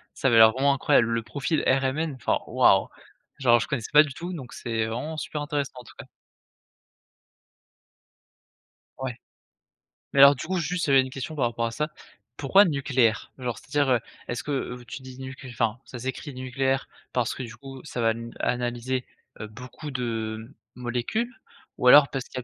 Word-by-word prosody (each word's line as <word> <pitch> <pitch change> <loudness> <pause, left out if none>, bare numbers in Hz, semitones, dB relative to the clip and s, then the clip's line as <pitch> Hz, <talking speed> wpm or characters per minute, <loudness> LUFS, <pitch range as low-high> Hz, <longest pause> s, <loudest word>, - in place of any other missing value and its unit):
ça 135 - +1
avait 115 - +4
l'air 110 0 +9
vraiment 140 +3 +2
incroyable. 120 -3 +3
Le 115 0 0
profil 145 +6 -2
RMN, 135 +4 +1
enfin, 125 - 0
waouh! - - +4 0.5
Genre, 120 -3 +5
je - - -3
connaissais 125 -7 -3
pas 150 - +10
du 145 -3 -2
tout 175 +3 -5
donc 130 -7 -8
c'est 115 -2 -2
vraiment 150 +8 -4
super 150 -1 -4
intéressant, 145 -1 -2
en - - -10
tout - - -15
cas. - - -11 2.9
Ouais. 130 -3 -4 0.9
Mais 140 - +2
alors 140 +1 +9
du 125 - -7
coup, 185 0 -1
juste, 175 +2 -1
j'avais 135 -2 +5
une 130 - -4
question 135 +4 -6
par 130 - +1
rapport 115 0 -1
à 115 - -2
ça, 150 +6 -2 0.5
pourquoi 190 +8 +5
nucléaire? 135 -7 +1
Genre, 125 -4 -4
c'est-à-dire, 140 -1 0
heu, 120 - +3 0.3
est-ce 120 +1 -4
que 140 -4 -2
vous 125 -1 -11
tu 135 +3 -8
dis 130 0 -11
nucl 130 0 -8
enfin, 115 0 -1
ça 125 - -9
s'écrit 130 +3 -5
nucléaire 130 +1 -1 0.3
parce 125 -1 0
que 130 - -5
du 110 -2 -8
coup 135 +1 -10
ça 125 -5 -5
va 115 0 +3
n 115 +1 -7
analyser, 125 +1 -1 0.3
heu, 110 - -5
beaucoup 125 +6 -9
de 115 -1 -4 0.2
molécules 125 - -2 0.4
ou 125 - +1
alors 145 +2 +9
parce 135 -2 -4
qu'il - - -10
y - - -7
130 Hz, 185 wpm, -26 LUFS, 120-140 Hz, 2.9 s, pas